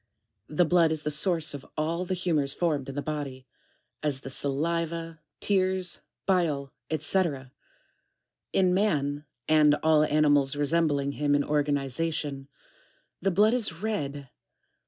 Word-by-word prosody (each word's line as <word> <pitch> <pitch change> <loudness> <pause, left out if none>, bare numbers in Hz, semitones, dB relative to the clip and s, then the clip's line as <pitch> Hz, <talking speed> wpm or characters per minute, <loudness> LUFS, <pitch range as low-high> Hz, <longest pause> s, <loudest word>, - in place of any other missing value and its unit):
15. 150 - -10
The 175 - +5
blood 165 -1 +4
is 155 -1 -1
the 150 - -1
source 165 +1 +2
of 140 -1 -7
all 165 +4 -1
the 185 - -2
humors 155 -6 0
formed 150 -6 -1
in 135 - -7
the 145 - -3
body; 140 -4 -5 0.6
as 140 -3 -1
the 135 - -6
saliva, 165 +4 -2 0.2
tears, 185 -2 +1 0.2
bile, 155 -8 +1 0.2
&c. 160 - 0
1G. 150 -5 -1 1.0
In 185 -1 +3
man, 150 -7 0 0.2
and 150 -1 +5
all 155 -1 +5
animals 145 -2 +3
resembling 145 -1 +1
him 145 0 +1
in 145 - +2
organization, 145 0 -1 0.7
the 195 - +2
blood 210 +5 +4
is 205 -7 -1
red. 145 - -3
155 Hz, 135 wpm, -27 LUFS, 145-170 Hz, 1.0 s, The